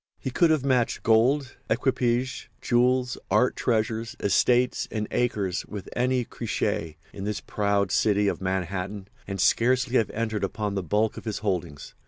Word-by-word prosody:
He 130 Hz, -, -5 dB
could 170 Hz, +6 st, +3 dB
have 155 Hz, -4 st, +2 dB
matched 125 Hz, -3 st, +1 dB
gold, 125 Hz, +5 st, +3 dB
equipages, 125 Hz, +1 st, 0 dB
jewels, 125 Hz, 0 st, +1 dB
art 125 Hz, -, +3 dB
treasures, 115 Hz, -1 st, -1 dB
estates 125 Hz, +5 st, +2 dB
and 105 Hz, -1 st, -3 dB
acres 105 Hz, -7 st, 0 dB
with 105 Hz, -3 st, -7 dB
any 125 Hz, 0 st, +1 dB
Croesus 80 Hz, -7 st, -2 dB, 0.2 s
in 100 Hz, -, -6 dB
this 105 Hz, 0 st, -2 dB
proud 100 Hz, -2 st, 0 dB
city 105 Hz, -1 st, +2 dB
of -, -, -1 dB
Manhattan, 95 Hz, +1 st, -3 dB, 0.2 s
and 100 Hz, -1 st, -4 dB
scarcely 125 Hz, +6 st, +3 dB
have 110 Hz, -, +1 dB
entered 110 Hz, -2 st, -2 dB
upon 105 Hz, +1 st, -2 dB
the 100 Hz, -, -1 dB
bulk 105 Hz, +6 st, 0 dB
of -, -, -8 dB
his 110 Hz, -2 st, -2 dB
holdings. 85 Hz, -7 st, -3 dB
110 Hz, 155 wpm, -26 LUFS, 100-125 Hz, 0.2 s, could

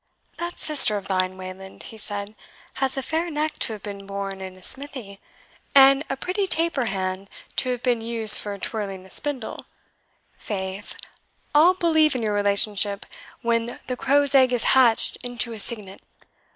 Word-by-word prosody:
"That 345 Hz, 0 st, -5 dB
sister 260 Hz, -8 st, +6 dB
of 195 Hz, -1 st, -8 dB
thine, 185 Hz, -1 st, -1 dB
Wayland," 190 Hz, +1 st, -10 dB
he 220 Hz, -, -10 dB
said, 205 Hz, 0 st, -5 dB, 0.5 s
"has 265 Hz, 0 st, +1 dB
a 270 Hz, -, -2 dB
fair 325 Hz, +4 st, -2 dB
neck 305 Hz, 0 st, -3 dB
to 225 Hz, -, 0 dB
have 210 Hz, -, -10 dB
been 200 Hz, -1 st, -8 dB
born 195 Hz, -1 st, -5 dB
in 190 Hz, -1 st, -8 dB
a 185 Hz, -, -18 dB
smithy, 255 Hz, -8 st, 0 dB, 0.6 s
and 275 Hz, +1 st, +7 dB
a 270 Hz, -, -3 dB
pretty 380 Hz, +7 st, -2 dB
taper 330 Hz, -7 st, +1 dB
hand 190 Hz, -1 st, -4 dB, 0.3 s
to 255 Hz, -, +2 dB
have 245 Hz, -1 st, -3 dB
been 245 Hz, -3 st, +1 dB
used 225 Hz, -2 st, +5 dB
for 205 Hz, -1 st, -5 dB
twirling 195 Hz, -3 st, -5 dB
a 190 Hz, -, -15 dB
spindle 275 Hz, -6 st, -2 dB, 0.7 s
faith, 190 Hz, -1 st, -6 dB, 0.6 s
I'll 330 Hz, +5 st, +5 dB
believe 315 Hz, -4 st, +2 dB
in 245 Hz, -, -3 dB
your 210 Hz, -1 st, -1 dB
relationship 205 Hz, 0 st, +1 dB, 0.4 s
when 230 Hz, 0 st, -1 dB
the 255 Hz, -, -3 dB
crow's 280 Hz, +2 st, +2 dB
egg 260 Hz, -2 st, +5 dB
is 245 Hz, -2 st, 0 dB
hatched 245 Hz, -4 st, +4 dB
into 245 Hz, -1 st, -2 dB
a 220 Hz, -, -8 dB
cygnet." 205 Hz, -3 st, -4 dB
230 Hz, 165 wpm, -23 LUFS, 200-270 Hz, 0.7 s, and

